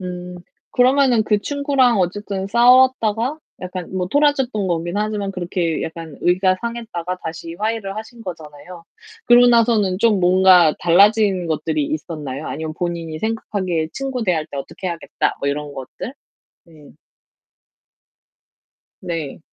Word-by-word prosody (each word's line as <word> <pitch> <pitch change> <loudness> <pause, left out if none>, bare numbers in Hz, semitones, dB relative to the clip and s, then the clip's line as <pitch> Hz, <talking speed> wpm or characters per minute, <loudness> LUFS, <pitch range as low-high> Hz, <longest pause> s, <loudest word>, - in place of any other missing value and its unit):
음 180 -1 -7 0.3
그러면 250 -3 +3
그 210 -1 +2
친구랑 275 -3 +1
어쨌든 190 +1 -2
싸웠다가 245 +2 +3 0.2
약간 180 -1 -6
뭐 180 -1 -2
토라졌던 265 -6 +1
거긴 170 +2 -2
하지만 210 -2 -2
그렇게 175 -3 -2
약간 160 -2 -7
의가 185 +1 +2
상했다가 225 -7 -4
다시 165 +1 -6
화해를 215 0 -3
하신 225 +1 -9
거잖아요. 165 0 -10 0.4
그러고 240 +1 +7
나서는 225 -5 +3
좀 215 -4 +3
뭔가 180 -2 +5
달라진 195 +1 +4
것들이 160 - -1
있었나요? 155 - -5
아니면 155 +1 -4
본인이 170 -2 -4
생각하기에 190 -7 -2
친구 265 -2 -3
대할 170 -7 0
때 140 - -9
어떻게 140 +6 -7
해야겠다, 170 -2 -2
뭐 140 - -1
이런 145 0 -4
것들? 135 - -8 0.5
네. 155 -3 -17 2.1
네. 165 -5 -5
185 Hz, 300 characters per minute, -20 LUFS, 170-230 Hz, 2.1 s, 그러고